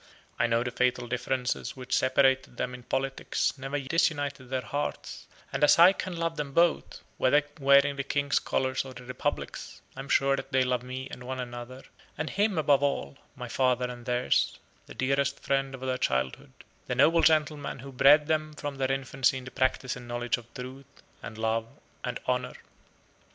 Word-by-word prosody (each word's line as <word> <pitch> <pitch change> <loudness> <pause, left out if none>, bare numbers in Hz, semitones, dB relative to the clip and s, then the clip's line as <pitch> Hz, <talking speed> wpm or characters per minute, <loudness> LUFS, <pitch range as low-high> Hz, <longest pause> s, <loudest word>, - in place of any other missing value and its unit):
I 120 - +3
know 115 0 +2
the 125 - -3
fatal 125 0 0
differences 125 +1 -2
which 125 0 -2
separated 130 -1 +2
them 125 - -2
in 125 - -8
politics 135 +2 -1
never 135 +1 -3
disunited 140 -2 0
their 130 -1 -2
hearts; 145 +1 -4 0.3
and - - -1
as 150 - +7
I 175 +3 +8
can 185 -3 -5
love 165 0 -2
them 145 -2 -4
both, 170 +1 +2 0.2
whether 145 +3 +4 0.2
wearing 140 0 +5
the 140 - -1
King's 140 0 +1
colors 130 0 -1
or 130 -1 -10
the 125 - -10
Republic's, 125 0 -4 0.2
I - - -10
am 135 +1 -7
sure 135 0 +3
that 135 - -7
they 130 -1 +3
love 125 -1 0
me 130 +1 -6
and 125 - -8
one 130 +1 -5
another, 120 +1 -7 0.3
and 150 +1 -3
him 205 -2 +1
above 145 -3 +4
all, 140 - -1 0.2
my - - -6
father 125 -1 +1
and 120 -1 -11
theirs, 125 0 +1 0.3
the - - -11
dearest 140 +1 0
friend 135 -1 0
of 130 - -13
their 130 -1 -2
childhood, 65 0 -1 0.3
the - - -1
noble 165 +1 +5
gentleman 155 -2 +2
who 135 +2 -9
bred 145 +3 +6
them 155 0 -1
from 145 -2 -5
their 135 0 0
infancy 135 0 +1
in 130 - -8
the 125 - -8
practice 130 0 0
and 125 -1 -10
knowledge 120 +1 -1
of 120 -1 -14
Truth, 130 +2 -10 0.2
and 110 - -8
Love 110 0 0 0.4
and 125 0 -3
Honor. 125 0 -1
130 Hz, 190 wpm, -28 LUFS, 125-140 Hz, 0.4 s, I